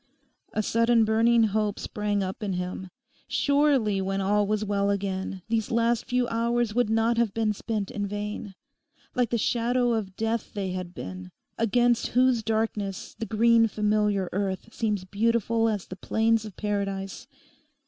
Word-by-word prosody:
A 215 - 0
sudden 230 +1 +3
burning 225 +2 +4
hope 210 -1 0
sprang 205 -1 -2
up 190 +3 -5
in 200 -3 -2
him. 180 +1 -4 0.4
Surely 280 -9 +2
when 195 +1 -1
all 205 +1 +2
was 215 0 0
well 200 -1 +1
again, 190 -2 -2
these 225 -1 0
last 235 0 +1
few 250 0 0
hours 235 -1 0
would 245 -1 +2
not 225 +1 +2
have 230 -4 +1
been 220 -2 +1
spent 210 -1 -3
in 205 -1 -3
vain. 205 -1 -5 0.6
Like 245 -3 +1
the 235 - +1
shadow 240 +2 +1
of 200 -4 -3
death 225 +1 -2
they 195 -2 -2
had 180 -1 -5
been, 90 - -7 0.3
against 240 +2 +2
whose 255 -2 +4
darkness 215 -3 -2
the 225 - -3
green 230 +1 +4
familiar 210 -2 +1
earth 195 +3 -3
seems 210 -4 -1
beautiful 225 +3 +1
as 205 -4 -2
the 185 - -8
plains 220 +3 +1
of 210 -4 -10
paradise. 195 -2 -3
215 Hz, 160 wpm, -26 LUFS, 200-230 Hz, 0.6 s, burning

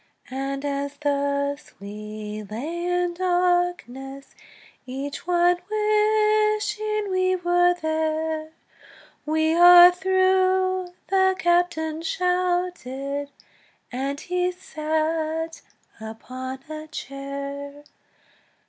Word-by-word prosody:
And 275 +1 -3
as 280 0 -3
thus 280 0 -1
we 210 +1 -7
lay 315 +11 -4
in 355 0 0
darkness, 350 -7 -1 0.5
Each 275 +5 -6
one 350 0 +3
wishing 425 0 +1
we 370 0 +2
were 355 0 +3
there, 315 0 -1 0.8
"We 315 +1 +2
are 350 +1 +9
through!" 375 0 +1
the 380 0 +3
captain 345 -3 +1
shouted, 350 -6 -1 0.6
And 275 +3 -3
he 360 +1 -1
sat 315 -1 -2 0.4
upon 255 +4 -7
a 310 0 -7
chair. 280 0 -7
320 Hz, 80 wpm, -24 LUFS, 280-360 Hz, 0.8 s, are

